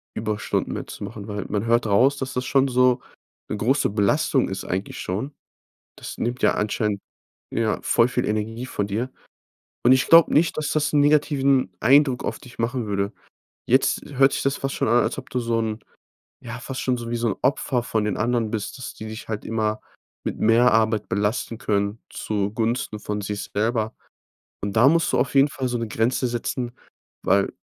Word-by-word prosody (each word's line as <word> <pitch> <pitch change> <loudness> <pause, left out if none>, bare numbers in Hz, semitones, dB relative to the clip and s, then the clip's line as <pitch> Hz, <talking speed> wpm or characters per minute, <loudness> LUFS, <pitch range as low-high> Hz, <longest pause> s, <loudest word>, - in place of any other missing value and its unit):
Überstunden 110 -1 -2
mehr - - -5
zu - - -8
machen, 105 -1 -7
weil, 105 -2 -4
man 105 +1 -1
hört 115 -1 +2
raus, 130 +8 +4
dass 130 -1 -4
das 125 0 -2
schon 135 0 +3
so 125 0 +3 0.5
'ne 105 - -2
große 135 +7 +2
Belastung 100 -1 +2
ist, - - -4
eigentlich 95 +2 -4
schon. 110 +11 -3 0.6
Das - - -8
nimmt 120 +2 -2
ja - - +4
anscheinend 105 -1 -1 0.5
ja, 115 -1 0
voll 115 - +3
viel 125 0 -1
Energie 110 +3 -2
von 100 -5 -2
dir. 115 +6 -2 0.7
Und 125 +2 +7
ich 130 - +2
glaube 165 -1 +7
nicht, 160 +3 +3
dass 155 -1 -1
das 150 -1 0
'n 145 - +4
negativen 140 - +3
Eindruck 135 +1 +4
auf - - -3
dich 125 - -15
machen 115 -1 -1
würde. 100 +1 -1 0.5
Jetzt - - +3
hört 135 +1 +5
sich - - -2
das 135 0 0
fast 135 0 -3
schon - - 0
an, 120 +1 +4
als - - -2
ob 130 - -13
du 125 - 0
so 115 -1 0
'n 110 -1 -3 0.6
ja, 120 0 -6
fast 130 +1 -5
schon 125 -1 0
so 120 - -6
'n 115 -3 -1
Opfer 130 -2 +1
von 110 -3 -1
den 105 - -1
anderen 115 -1 0
bist, 110 +2 -4
dass 130 - -7
die 110 - -8
dich 110 +2 -8
halt 105 -1 -4
immer 110 -1 -1 0.4
mit - - -4
mehr 115 +3 +5
Arbeit 110 -1 +1
belasten 105 +2 -1
können 100 0 -1
zugunsten 110 +2 -2
von 105 0 -4
sich 100 0 -4
selber. 110 +1 0 0.7
Und 100 0 -3
da 120 +4 +6
musst 165 +1 +2
du - - +3
auf 135 - 0
jeden 135 +2 +6
Fall 130 -1 -3
so’ne 115 -2 -2
Grenze 115 +4 0
setzen, 120 +1 -3 0.5
weil 100 +1 +2
115 Hz, 190 wpm, -23 LUFS, 105-130 Hz, 0.7 s, Und